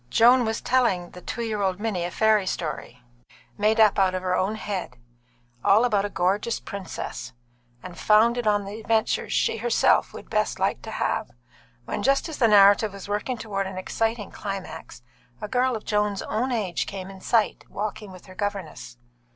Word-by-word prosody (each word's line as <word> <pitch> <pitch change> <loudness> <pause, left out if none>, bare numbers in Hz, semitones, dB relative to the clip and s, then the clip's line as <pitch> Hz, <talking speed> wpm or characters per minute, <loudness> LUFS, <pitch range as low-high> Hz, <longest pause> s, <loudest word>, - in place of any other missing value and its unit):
Joan 245 +2 +5
was 220 0 -2
telling 195 -9 +1
the 180 - -11
two 235 +5 -4
year 215 -2 -2
old 190 -1 0
Minnie 205 -6 -2
a - - -2
fairy 215 0 +2
story, 135 -8 -5 0.5
made 215 +2 +2
up 215 -2 +5
out 190 -1 +3
of 185 - -3
her 185 0 +1
own 195 +4 0
head, 195 - -5 0.7
all 215 +5 +5
about 205 -4 +1
a - - -3
gorgeous 200 +5 0
princess, 200 -8 -7 0.5
and 180 -1 -8
founded 230 +2 +3
on 205 -1 +2
the 205 +3 -7
adventures 220 0 0
she - - +1
herself 235 +1 +2
would - - -10
best - - 0
like - - 0
to - - -8
have, - - -2 0.6
when, - - -3
just 275 +4 +2
as 320 - -7
the 235 - +5
narrative 205 0 +6
was 200 -1 -9
working 210 +5 -2
towards 195 -3 -3
an 190 - -8
exciting 225 +2 -2
climax, 195 - -7 0.4
a - - -5
girl 250 +2 +1
of 215 - -7
Joan's 210 -2 0
own 245 +5 -1
age 200 -8 -1
came 195 -1 -6
in 190 -1 -12
sight, 225 0 +1
walking 210 -1 -5
with 185 -1 -13
her 185 - -13
governess. 195 - -5
205 Hz, 185 wpm, -25 LUFS, 190-225 Hz, 0.7 s, narrative